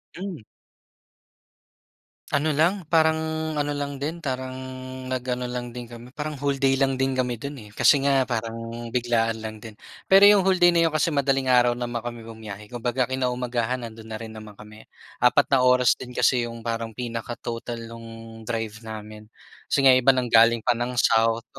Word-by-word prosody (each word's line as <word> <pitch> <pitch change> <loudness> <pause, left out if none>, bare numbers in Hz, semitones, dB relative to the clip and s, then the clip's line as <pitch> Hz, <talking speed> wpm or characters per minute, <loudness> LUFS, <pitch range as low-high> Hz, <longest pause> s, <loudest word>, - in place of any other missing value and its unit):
Hmm. 180 - -6 1.9
Ano 150 +1 +1
lang, 170 +2 +1
parang 160 -1 +3 0.4
ano 145 0 -1
lang 140 -1 -4
din, 165 +4 -4
parang 130 -1 -3 0.6
nag-ano 125 0 -2
lang 125 -1 -5
din 120 -1 -8
kami, 120 +1 -10
parang 150 -2 -5
whole 140 -1 0
day 135 0 +2
lang 135 -1 +2
din 135 +1 0
kami 125 -1 0
dun, 140 +4 -7
eh, 105 - -12
kasi 145 - +5
nga 135 -1 +3
parang 115 -1 -5
biglaan 115 -2 0
lang 110 0 -6
din. 110 -1 -11 0.3
Pero 195 +1 +7
yung 205 0 +8
whole 190 0 +3
day 175 -1 +5
na 170 -1 +3
yun 155 - -4
kasi 155 +2 +2
madaling 135 -2 +1
araw 120 -1 +4
naman 120 -1 -3
kami 120 0 -7
bumiyahe. 110 -1 -10
Kumbaga, 120 +1 -1
kinaumagahan, 125 -1 -1
nandun 110 -1 -9
na 110 - -6
rin 110 0 -7
naman 110 -1 -11
kami, 110 +1 -14 0.3
4 125 +4 +4
na 135 - +5
oras 125 -1 +4
din 125 -1 -9
kasi 125 -1 +2
yung 115 -1 -9
parang 115 -1 -4
pinaka-total 115 -1 -5
nung 115 0 -10 0.4
drive 115 -2 -3
namin 105 0 -9 0.5
kasi 140 - +4
nga 130 - +7
iba 130 +1 +5
ng 125 -2 -1
galing 115 0 +5
pa 120 0 +1
ng 120 +1 -2
south, 115 0 +3
125 Hz, 180 wpm, -24 LUFS, 115-135 Hz, 1.9 s, yung